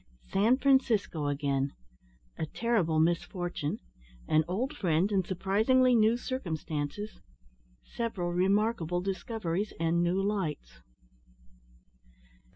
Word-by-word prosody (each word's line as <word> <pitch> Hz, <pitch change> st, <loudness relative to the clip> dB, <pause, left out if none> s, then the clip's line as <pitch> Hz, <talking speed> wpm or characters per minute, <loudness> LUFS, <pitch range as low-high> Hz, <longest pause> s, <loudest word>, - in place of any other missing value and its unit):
SAN 220 Hz, +6 st, +4 dB
FRANCISCO 235 Hz, -, +2 dB
AGAIN 140 Hz, -1 st, -1 dB, 0.7 s
A 160 Hz, -, -1 dB
TERRIBLE 190 Hz, -7 st, +1 dB
MISFORTUNE 175 Hz, -1 st, -1 dB, 0.5 s
AN 155 Hz, 0 st, +4 dB
OLD 245 Hz, -, -2 dB
FRIEND 180 Hz, -, +1 dB
IN 195 Hz, -2 st, +2 dB
SURPRISINGLY 215 Hz, +8 st, +2 dB
NEW 225 Hz, 0 st, +4 dB
CIRCUMSTANCES 170 Hz, -, -4 dB, 0.6 s
SEVERAL 190 Hz, -7 st, -3 dB
REMARKABLE 185 Hz, -2 st, +1 dB
DISCOVERIES 195 Hz, 0 st, -3 dB
AND 165 Hz, +1 st, +2 dB
NEW 175 Hz, +2 st, +1 dB
LIGHTS. 190 Hz, -, -3 dB
190 Hz, 90 wpm, -30 LUFS, 165-220 Hz, 0.7 s, SAN